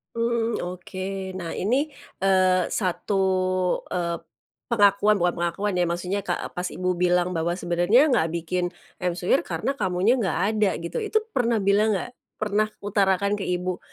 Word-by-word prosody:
Mmm, 230 0 0
oke. 180 +1 -7 0.4
Nah 170 -3 -5
ini, 215 +7 +1 0.5
eee, 185 -2 +3
1, 195 0 -1 0.7
eee, 170 -1 -1 0.6
pengakuan 205 -1 +4
bukan 175 0 +1
pengakuan 180 +4 -1
ya, 180 - +2
maksudnya, 180 +3 -2
ka 175 - -1 0.2
pas 180 +1 -2
ibu 185 -1 -1
bilang 180 0 +2
bahwa, 165 +1 0
sebenarnya 175 - +3
nggak 210 -10 +3
bikin 175 +1 -2 0.3
ayam 180 0 -1
suwir, 185 +10 +2
karena 275 - -2
kamunya 190 +1 +2
nggak 200 -10 -1 0.2
ada, 210 -2 +3
gitu. 170 - -4
Itu, 435 +1 +2 0.2
pernah 235 -3 +2
bilang 210 +2 +4
nggak? 245 - -6 0.3
Pernah 215 0 +1
utarakan 200 0 +1
ke 195 - -3
ibu 180 0 -2
185 Hz, 150 wpm, -25 LUFS, 175-210 Hz, 0.7 s, pengakuan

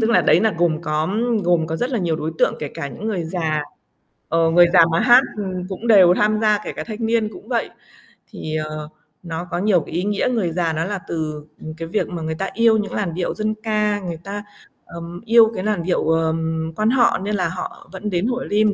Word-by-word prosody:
tức 225 +1 +2
là - - +5
đấy - - +4
là 220 -2 +2
gồm 170 -2 +1
có 155 +1 -1 0.4
gồm 170 -2 +2
có 160 0 -3
rất 245 +7 -2
là 240 - 0
nhiều 170 -4 0
đối 160 +1 -3
tượng - - +3
kể 145 - -4
cả 140 - -4
những 215 - -7
người 185 -6 -2
già, 160 -3 -1 0.7
ờ, 165 0 +3
người 175 +1 +6
già 165 - +8
mà 165 - +2
hát, 245 +2 +7 0.2
ừm, 185 -3 -4
cũng 200 +5 -6
đều 185 -5 +7
tham 215 +2 +2
gia 210 -1 +3
kể - - -5
cả - - -5
thanh 225 0 -5
niên 225 -1 +1
cũng 365 - -13
vậy. - - -1 0.6
Thì, 155 0 -5
ờ, 155 0 -4 0.3
nó 170 +1 -5
có - - -1
nhiều 185 -3 +3
cái - - -10
ý 180 - 0
nghĩa. 205 +2 0
Người 210 -9 0
già 165 -1 0
nó 160 +2 -1
là 200 -1 -3
từ, 155 -2 -4 0.2
ừm, 155 - -7
cái 165 +1 -7
việc 210 +5 -1
mà 170 -2 -5
người 160 0 -3
ta 195 +3 -3
yêu 225 +1 +4
những 210 - -3
làn 185 -6 -2
điệu 175 0 -2
dân 215 0 -1
ca, 210 -2 +1
người 170 -4 -6
ta, 205 +1 -5 0.4
ờm, 170 +1 -9
yêu 230 0 +6
cái 185 - -3
làn 210 -5 -1
điệu, 175 -2 0
ờm, 160 0 0
Quan 215 +4 +1
họ 245 -1 +3
nên 205 +2 -3
là 180 -4 0
họ 180 +1 -7
vẫn 200 +3 -4
đến 180 +4 0
Hội 250 0 -2
Lim 210 0 +3
180 Hz, 245 wpm, -21 LUFS, 165-215 Hz, 0.7 s, già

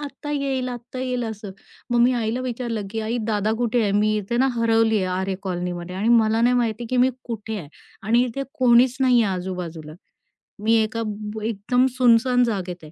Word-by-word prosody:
आत्ता 290 0 -7
येईल, 270 -3 -1
आत्ता 245 +1 -7
येईल 250 -2 -2
असं. 215 -2 -6 0.4
मग 240 - +3
मी 245 +2 +5
आईला 235 +1 -1
विचारलं, 235 -4 -3
की 225 - -3
"आई 225 +3 -2
दादा 215 -1 0
कुठे 240 0 +1
आहे? 200 -2 +1
मी 210 +1 +2
इथे 210 +4 -3
ना 265 +2 +3
हरवली 225 -1 +2
आहे 190 - +1 0.2
आरे 190 0 -2
कॉलनीमध्ये 180 -1 -4
आणि 215 +4 0
मला 225 -1 +4
नाही 245 +1 +3
माहिती, 235 -1 -1
की 255 - 0
मी 255 +1 +4
कुठे 220 -2 -5
आहे 150 -5 -9 0.3
आणि 235 +4 +3
इथे 255 +3 -4 0.2
कोणीच 250 0 +5
नाही 250 -3 +4
आहे 195 -3 0
आजूबाजूला. 175 -4 -6 0.7
मी 225 +1 +3
एका 225 +1 -3
बु 210 +1 -6
एकदम 225 +4 +1
सुनसान 245 0 +4
जागेत 185 -7 -3
आहे." 155 - -12
225 Hz, 195 wpm, -23 LUFS, 205-245 Hz, 0.7 s, मी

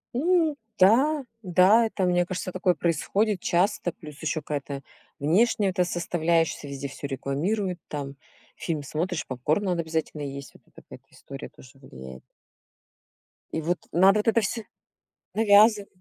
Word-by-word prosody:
Ну 325 +1 +2 0.2
да, 265 +10 +4 0.2
да, 190 +5 +5
это, 195 -3 -3
мне 175 0 +2
кажется, 185 0 -4
такое 180 -1 +1
происходит 185 +6 0
часто, 175 0 0
плюс 150 0 -12
ещё 155 0 -2
какая-то 140 -1 -5 0.4
внешняя 195 +6 +2
эта 180 0 +1
составляешься, 170 -3 0
везде 140 0 -5
всё 140 +1 -7
рекламируют, 175 - -2
там 140 -2 -5 0.4
фильм 155 -4 -3
смотришь, 165 +4 -3
попкорн 140 +10 -1
надо 175 -2 0
обязательно 160 -2 -3
есть. 140 -1 -6
Вот - - -19
это - - -17
какая-то - - -14
история 135 0 -10
тоже 130 +1 -18
влияет. 65 - -11 1.3
И 160 - -1
вот 175 +3 0
надо 195 +4 +5
вот 210 - -3
это 230 0 +3
всё. 220 +2 -3 0.7
Навязыв 210 -1 +5
175 Hz, 140 wpm, -26 LUFS, 145-205 Hz, 1.3 s, да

